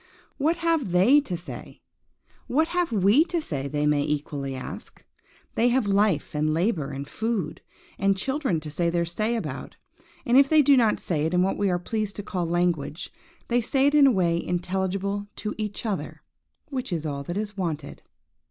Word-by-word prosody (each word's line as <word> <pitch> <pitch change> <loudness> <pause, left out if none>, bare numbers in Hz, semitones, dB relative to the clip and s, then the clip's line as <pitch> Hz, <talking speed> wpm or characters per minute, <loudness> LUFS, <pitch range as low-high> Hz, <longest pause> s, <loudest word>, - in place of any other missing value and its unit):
What 315 +4 +2
have 330 - 0
they 240 +12 +6
to 180 -7 -3
say?–What 275 - -6
have 355 -5 0
we 210 - +5
to 345 0 -1
say, 140 - -4
they 145 +1 -1
may 150 -1 +3
equally 145 -2 -2
ask. 130 - -9 0.5
They 235 - +3
have 250 -1 +2
life, 200 -5 +1
and 155 +1 +1
labour, 170 -5 0
and 140 0 -6
food, 205 -8 -3 0.4
and 195 0 +2
children 265 - -1
to 150 0 -7
say 170 +3 0
their 170 0 0
say 215 +7 -1
about; 225 - -5 0.5
and 245 +1 +4
if 275 0 +6
they 310 -1 +6
do 280 0 +6
not 230 -4 +3
say 155 -3 -1
it 170 - -1
in 180 - +4
what 190 - +1
we 200 -1 +1
are 180 - +1
pleased 210 +3 -3
to 205 - -5
call 180 -4 -2
language, 165 -3 -1 0.3
they 240 0 +2
say 265 +4 +1
it 285 - +3
in 290 -2 +7
a - - +5
way 170 -5 +1
intelligible 190 +3 -2
to 210 - -4
each 210 +1 -4
other, 210 -4 -4 0.5
which 260 -5 -4
is 165 -3 -2
all 140 -2 -3
that 175 +6 -5
is 210 -1 -3
wanted. 160 -7 -4
195 Hz, 190 wpm, -25 LUFS, 165-235 Hz, 0.5 s, in